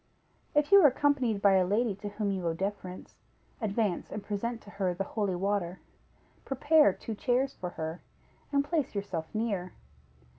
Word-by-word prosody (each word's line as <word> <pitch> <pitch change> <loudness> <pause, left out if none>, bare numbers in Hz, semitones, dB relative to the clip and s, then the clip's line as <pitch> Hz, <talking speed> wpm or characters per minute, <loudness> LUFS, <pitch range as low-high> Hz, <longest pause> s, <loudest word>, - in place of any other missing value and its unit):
If 295 +4 +3
you 400 0 +9
are 305 - +9
accompanied 260 -6 +1
by 195 -1 +6
a 185 - +4
lady 210 +4 +1
to 205 +1 -5
whom 205 0 -2
you 185 -3 -2
owe 165 - 0
deference, 190 0 -5 0.5
advance 210 -3 -1
and 210 - -5
present 225 +3 -3
to 205 - -13
her 190 -3 -1
the 195 - -1
holy 200 -2 -2
water; 190 -1 -1 0.6
prepare 295 -1 +4
two 225 - -6
chairs 255 +4 0
for 180 - -5
her, 160 0 -5 0.5
and 280 0 +2
place 300 -7 -1
yourself 185 -5 -3
near. 205 -5 -2
205 Hz, 170 wpm, -30 LUFS, 190-245 Hz, 0.6 s, you